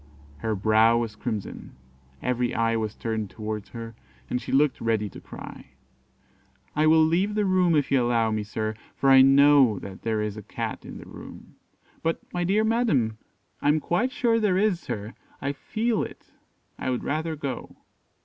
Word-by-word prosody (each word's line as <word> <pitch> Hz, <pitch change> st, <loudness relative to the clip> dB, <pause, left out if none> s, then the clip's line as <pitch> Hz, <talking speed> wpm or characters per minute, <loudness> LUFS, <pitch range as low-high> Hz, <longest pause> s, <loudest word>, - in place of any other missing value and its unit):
Her 110 Hz, +6 st, -2 dB
brow 110 Hz, +3 st, +4 dB
was 115 Hz, -3 st, -2 dB
crimson 110 Hz, -2 st, -5 dB, 0.5 s
every 125 Hz, -1 st, 0 dB
eye 115 Hz, 0 st, +1 dB
was 110 Hz, -2 st, -2 dB
turned 110 Hz, -3 st, -3 dB
towards 105 Hz, -1 st, -5 dB
her, 115 Hz, -1 st, -7 dB, 0.4 s
and 125 Hz, -, 0 dB
she -, -, -6 dB
looked 145 Hz, +1 st, +2 dB
ready 110 Hz, -2 st, 0 dB
to -, -, -12 dB
cry. -, -, -11 dB, 1.0 s
"I 155 Hz, +1 st, +3 dB
will 160 Hz, 0 st, +6 dB
leave 185 Hz, +6 st, +1 dB
the 210 Hz, -1 st, +1 dB
room, 185 Hz, -3 st, +3 dB
if 145 Hz, -2 st, +1 dB
you 135 Hz, -, +4 dB
will 120 Hz, -, +1 dB
allow 115 Hz, -2 st, +2 dB
me, 110 Hz, 0 st, -1 dB
sir, 110 Hz, +1 st, -3 dB, 0.2 s
for 135 Hz, -, +3 dB
I 135 Hz, 0 st, +9 dB
know 135 Hz, -4 st, +6 dB
that 95 Hz, 0 st, -9 dB
there 110 Hz, -2 st, -1 dB
is 105 Hz, 0 st, -4 dB
a -, -, -6 dB
Cat -, -, -5 dB
in -, -, -8 dB
the -, -, -11 dB
room." -, -, -12 dB, 0.5 s
"But, 165 Hz, 0 st, 0 dB
my 175 Hz, 0 st, -1 dB
dear 200 Hz, +5 st, +2 dB
madam 215 Hz, -, +1 dB, 0.2 s
" -, -, -42 dB
"I -, -, 0 dB
am 150 Hz, +1 st, +4 dB
quite 215 Hz, -, 0 dB
sure 235 Hz, -4 st, +2 dB
there 205 Hz, -4 st, +2 dB
is, 200 Hz, -3 st, +2 dB
sir; 105 Hz, -7 st, -5 dB, 0.3 s
I 140 Hz, -, -1 dB
feel 220 Hz, -, -1 dB
it -, -, -8 dB, 0.5 s
I -, -, -2 dB
would 125 Hz, -, -1 dB
rather 160 Hz, +2 st, -2 dB
go." 140 Hz, -5 st, -5 dB
130 Hz, 190 wpm, -26 LUFS, 110-165 Hz, 1.0 s, I